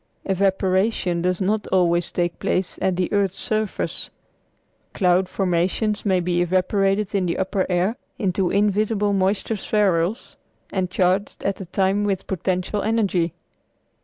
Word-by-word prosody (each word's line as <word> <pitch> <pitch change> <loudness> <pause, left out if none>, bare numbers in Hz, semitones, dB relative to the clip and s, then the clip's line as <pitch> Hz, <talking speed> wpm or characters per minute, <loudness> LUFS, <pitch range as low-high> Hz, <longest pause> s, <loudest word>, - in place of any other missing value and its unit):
Evaporation 190 -1 +1
does 180 0 0
not 205 +2 0
always 175 -2 +2
take 175 -1 -1
place 185 -1 -1
at 185 - +1
the 180 +2 -1
earth's 195 -2 +1
surface. 215 -2 -2 0.9
Cloud 180 -1 +2
formations 190 +4 0
may 190 -2 +3
be 175 0 0
evaporated 195 +3 +1
in 190 -3 +1
the 170 - -1
upper 190 0 -1
air 185 +5 +1 0.2
into 190 -3 0
invisible 205 +1 +1
moisture 195 +3 +1
spherules, 195 -1 0 0.4
and 185 -2 0
charged 185 +2 0
at 195 -1 -1
the 190 - -8
time 195 +3 +1
with 195 -2 -1
potential 185 +2 -2
energy. 195 -7 0
190 Hz, 135 wpm, -22 LUFS, 180-205 Hz, 0.9 s, may